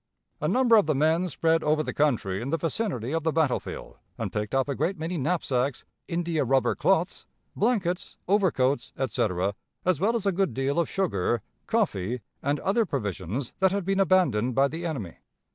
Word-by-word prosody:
A - - +1
number 245 -3 +5
of 205 - +3
the 155 - +2
men 160 +5 +2
spread 165 0 +1
over 155 +1 +2
the - - -4
country 115 -10 +1
in 125 - -4
the 165 - +1
vicinity 165 - -2
of 165 +1 0
the 160 +1 0
battlefield, 155 -5 -2 0.2
and - - -4
picked 105 +3 -2
up 135 0 +2
a 140 - -1
great 165 +8 -1
many 165 +3 -3
knapsacks, 140 -4 -1 0.2
India 170 -3 0
rubber 135 +1 +2
cloths, 185 -1 0 0.3
blankets, 195 -6 0
overcoats, 170 -9 +1
etc., 100 -6 0 0.3
as 180 -5 +2
well 215 +6 +2
as 220 -4 -1
a 195 - +3
good 185 - 0
deal 135 +4 0
of 170 - 0
sugar, 120 - 0 0.2
coffee, 125 - 0 0.2
and 145 +2 0
other 215 +4 +2
provisions 115 - -3
that 190 0 +4
had 200 -2 -1
been 195 +1 +1
abandoned 140 - +3
by 135 +1 +4
the 165 +4 -4
enemy.... 110 - -5
155 Hz, 180 wpm, -27 LUFS, 130-185 Hz, 0.3 s, number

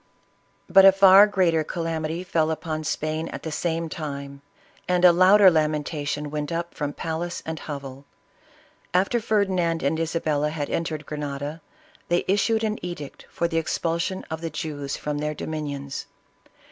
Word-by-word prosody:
But 195 - +7
a 195 - +10
far 195 +1 +8
greater 175 -6 +2
calamity 165 0 -3
fell 160 -3 +1
upon 155 -1 -3
Spain 155 +1 -2
at - - -7
the 160 - -4
same 165 +1 -2
time, 140 -3 -6 0.5
and 180 0 +3
a 180 - +9
louder 190 +2 +7
lamentation 150 -2 -1
went 150 0 -3
up 170 +1 -3
from 145 -1 -3
palace 165 +3 -4
and 160 -1 -4
hovel. 140 -2 -7 0.9
After 195 +6 +2
Ferdinand 190 -7 0
and 150 +4 0
Isabella 155 -2 0
had 150 -2 -4
entered 155 -2 -2
Grenada, 145 +1 -5 0.5
they 175 0 +1
issued 220 +3 +2
an 215 -3 -2
edict 175 -6 -7
for 170 - -1
the 165 -1 0
expul 165 0 -1
sion 185 +2 -3
of 160 0 -4
the 165 - -3
Jews 145 -3 -4
from 150 0 -3
their 150 0 -2
dominions. 145 -3 -5
160 Hz, 155 wpm, -24 LUFS, 150-175 Hz, 0.9 s, a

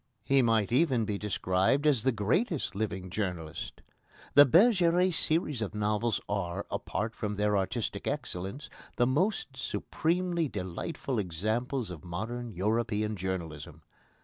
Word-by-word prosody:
He 135 +3 +4
might 115 -3 +2
even 130 -4 +3
be 105 -2 -2
described 100 +6 +1
as 140 -7 +4
the 130 - +2
greatest 130 - 0
living 95 -3 -3
journalist. 85 -5 -4 0.5
The 145 0 +9
Bergeret 180 - +5
series 155 -6 +1
of 110 -1 -3
novels 105 +2 +1
are, 100 -1 -2
apart 110 +4 -2
from 105 -1 -3
their 105 0 +1
artistic 105 +4 -2
excellence, 95 +12 -4 0.3
the 120 - +3
most 145 - 0
supremely 165 - -1
delightful 100 +4 -4
examples 110 - -2
of 85 -1 -9
modern 110 +8 -4
European 105 +1 0
journalism. 85 -6 -5
110 Hz, 125 wpm, -30 LUFS, 95-135 Hz, 0.5 s, The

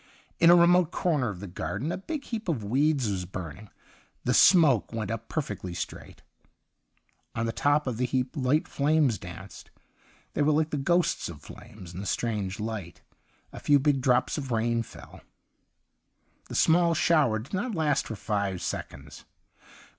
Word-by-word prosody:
In 165 - +6
a 175 - +9
remote 175 -1 +5
corner 150 -9 0
of 95 -3 -7
the - - -6
garden 105 - -4
a - - -2
big 290 +8 -5
heap 225 -7 -5
of 135 -10 -1
weeds 135 +4 +1
was 95 -3 -2
burning; 90 +2 -8 0.5
the - - +1
smoke 155 - +5
went 110 -2 -3
up 115 0 -5
perfectly 100 - -4
straight. - - -7 1.1
On 115 - -1
the 115 - -1
top 145 +4 +1
of 125 -4 -3
the 125 +1 0
heap 125 0 -2
light 140 +3 +1
flames 145 - +1
danced; - - -10 0.6
they - - -1
were 150 +1 +3
like 155 +1 +1
the 150 - -1
ghosts 170 - +1
of 75 -4 -10
flames 90 -5 -12
in 90 - -7
the 100 - -5
strange 105 -3 -2
light. 105 -6 -6 0.5
A - - -8
few 145 - +4
big 140 -1 +1
drops 125 +3 +2
of 135 -2 -6
rain 115 0 +1
fell. 115 - -12 1.3
The - - -6
snaall 170 0 +4
shower 155 -9 +3
did 110 - -9
not 205 +4 -2
last 150 -4 +1
for 110 - -5
five 100 -3 -2
seconds. 70 +2 -6
125 Hz, 170 wpm, -27 LUFS, 105-155 Hz, 1.3 s, a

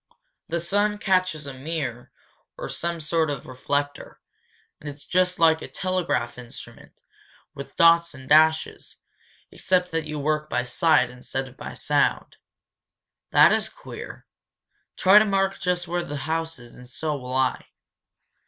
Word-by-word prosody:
The 170 +1 -2
sun 205 +5 +1
catches 185 -6 0
a 140 - -7
mirror 130 -3 -5 0.5
or - - -5
some 170 0 -3
sort 160 0 0
of 145 -3 -4
reflector, 145 +3 -3 0.6
and 150 - -7
it's 145 0 -11
just 180 0 +1
like 160 -1 +4
a - - -6
telegraph 175 -11 -2
instrument, 120 -2 -11 0.5
with 140 - -9
dots 170 -2 +5
and 130 -1 -12
dashes, 160 +1 +3 0.5
except 180 -1 0
that 165 -1 -1
you 150 0 -4
work 150 +1 -1
by 125 - 0
sight 125 0 +2
instead 130 +1 -5
of 125 - -15
by - - -8
sound. - - 0 0.9
That - - +6
is - - 0
queer. - - -10 0.7
Try 195 +3 +7
to 215 - +3
mark 195 -1 0
just 180 -1 -1
where 175 +1 -1
the 145 -2 -5
house 160 +1 -2
is, 120 -1 -14
and 125 0 -13
so 155 +4 -3
will 130 -2 -6
I." 130 0 0
160 Hz, 150 wpm, -24 LUFS, 135-175 Hz, 0.9 s, Try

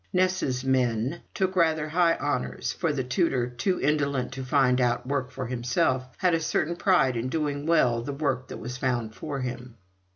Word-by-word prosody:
"Ness's 180 -9 +1
men" 130 +3 +1
took 190 -1 0
rather 160 -3 +2
high 170 +1 +3
honours, 145 -3 -2
for 165 -3 -1
the 140 -3 -1
tutor, 130 -2 +1
too 180 +10 -1
indolent 140 -4 0
to 130 0 -5
find 130 -1 +3
out 120 0 +1
work 135 -1 -1
for 130 - -5
himself, 130 +2 0
had 180 -2 +2
a 165 - +3
certain 160 +1 0
pride 160 -9 +3
in 115 +2 -2
doing 145 -1 -2
well 125 -8 +3
the 125 - -4
work 135 -3 -1
that - - -7
was 125 +1 -6
found 120 -4 -1
for 140 +2 -5
him. 125 -1 -5
135 Hz, 185 wpm, -27 LUFS, 125-160 Hz, -, high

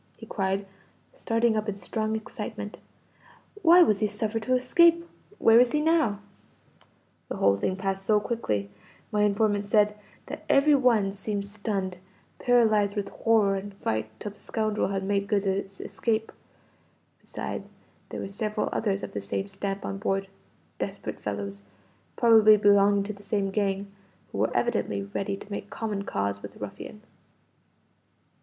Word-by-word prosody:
he - - -10
cried, 195 0 -1 0.5
starting 230 - +1
up 215 0 -1
in 200 - -4
strong 215 +2 -2
excitement. 220 - -6 0.8
"Why 350 +1 +8
was 210 -9 +2
he 215 - +2
suffered 215 +2 -2
to 255 +3 +1
escape? 335 +6 +4 0.3
Where 225 +1 +6
is 245 -1 +4
he 300 - +3
now?" 300 -10 +2 1.1
"The - - -3
whole 100 0 +3
thing 140 - -1
passed 195 0 -3
so 210 +1 +3
quickly, 105 - -2 0.4
my 210 - +1
informant 205 0 +2
said, 210 0 +3 0.3
that - - -7
every 285 +2 +5
one 235 -8 +3
seemed 200 0 -3
stunned, 200 -3 -3 0.4
paralyzed 220 -5 +3
with 200 -1 -2
horror 220 -3 +2
and 200 +1 -6
fright 110 - -2
till 210 - -5
the 205 - -20
scoundrel 215 -1 -1
had 195 0 -2
made 200 0 0
good 200 -1 +1
his 195 0 -2
escape; 220 +3 -2 0.9
beside - - -5 0.5
there - - -5
were - - -4
several 210 +2 -2
others 200 -3 -1
of - - -5
the 100 - -4
same 100 - -3
stamp 195 0 -4
on 195 - -4
board 195 -1 -1 0.5
desperate - - -4
fellows, 100 -1 -5 0.5
probably 220 -2 +7
belonging 200 0 +4
to 210 +2 -5
the 200 - -15
same 200 -1 -1
gang 200 -1 -1 0.4
who - - -5
were - - +1
evidently 100 -1 0
ready 195 - -3
to 200 - -12
make 200 - -5
common 215 -3 -3
cause 100 - -2
with - - -9
the - - -17
ruffian. - - -8
205 Hz, 155 wpm, -27 LUFS, 195-220 Hz, 1.1 s, Why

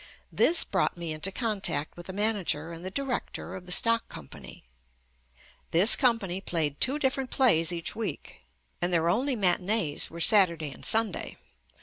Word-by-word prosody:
This 340 - +4
brought 190 -2 -2
me 170 -2 -5
into 155 +5 -3
contact 205 - -2
with 175 0 -11
the - - -6
manager 195 -6 -1
and 165 +1 -10
the 185 - -5
director 255 -6 -5
of 185 -1 -11
the - - -7
stock 230 +4 +2
company. 70 - -12 1.1
This 185 +7 +6
company 215 -8 0
played 155 -6 -3
two 270 +4 +2
different 265 -2 -2
plays 165 -13 +2
each 170 -1 -3
week, 225 -1 -6 0.4
and 175 +1 0
their 170 -1 +1
only 260 +8 0
matinees 180 -4 0
were 170 - -10
Saturday 170 -5 +4
and - - -14
Sunday. 220 -3 -1
190 Hz, 155 wpm, -27 LUFS, 170-230 Hz, 1.1 s, This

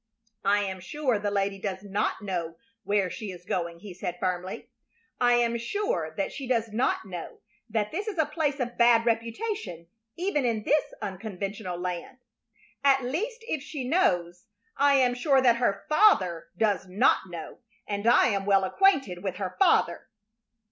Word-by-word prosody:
"I 205 +1 +3
am 190 -1 -4
sure 260 +2 -1
the 205 0 -1
lady 200 -1 -1
does 190 -1 -4
not 205 +2 -1
know 175 -4 -3 0.3
where 200 -2 +1
she 215 - -6
is 175 -1 -12
going," 170 -2 -3
he 200 -3 -9
said, 175 0 -5
firmly. 185 0 -3 0.5
"I 245 -1 +4
am 235 -1 +2
sure 410 - -2
that - - -1
she 275 -3 -6
does 230 -3 +1
not 225 +1 0
know 180 -4 -8 0.3
that 215 +1 -1
it 400 +6 -3
is 410 -4 -4
a 315 - +3
place 300 -2 -1
of 245 -1 -3
bad 235 -1 +5
reputation, 230 - -2 0.3
even 345 -5 0
in 225 -3 0
this 300 +6 +1
unconventional 195 -1 -5
land. 180 +7 -5 0.7
At 270 -1 +4
least, 445 - -3
if 310 - -2
she 275 -3 -5
knows, 180 - +1 0.3
I 285 0 +4
am 255 -2 +4
sure 270 +2 +3
that 245 -3 +4
her 235 -5 0
father 200 - +4
does 205 -2 +1
not 190 0 +2
know, 170 -2 -8 0.3
and 205 +1 -3
I 240 +1 +6
am 200 -2 -1
well 195 -1 +4
acquainted 270 - +2
with 190 -2 -3
her 185 -1 -4
father." 385 - +3
220 Hz, 170 wpm, -27 LUFS, 190-270 Hz, 0.7 s, I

